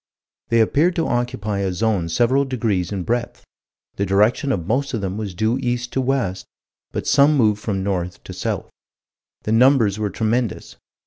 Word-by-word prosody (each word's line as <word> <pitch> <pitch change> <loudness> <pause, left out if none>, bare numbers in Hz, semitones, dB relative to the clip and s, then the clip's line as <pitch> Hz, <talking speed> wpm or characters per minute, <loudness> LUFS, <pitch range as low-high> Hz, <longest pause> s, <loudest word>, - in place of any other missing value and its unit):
They 115 0 +4
appeared 160 +10 +2
to 165 - 0
occupy 120 -4 -2
a 95 -1 0
zone 95 -3 0
several 120 +9 +2
degrees 110 -9 -1
in 95 -3 -3
breadth. 120 +4 -3 0.5
The 100 - 0
direction 105 - +2
of 90 -9 -2
most 130 +6 0
of 110 - -3
them 95 -1 -3
was 105 -4 -5
due 110 +7 0
east 125 -1 -2
to 135 - +1
west, 125 -8 -1 0.4
but - - -4
some 145 +2 +4
moved 105 -4 +2
from 95 -3 -2
north 90 -3 -3
to - - -8
south. - - -3 0.7
The 105 - -2
numbers 115 -3 +4
were 105 -1 -1
tremendous. 110 +2 -2
110 Hz, 175 wpm, -21 LUFS, 100-125 Hz, 0.7 s, They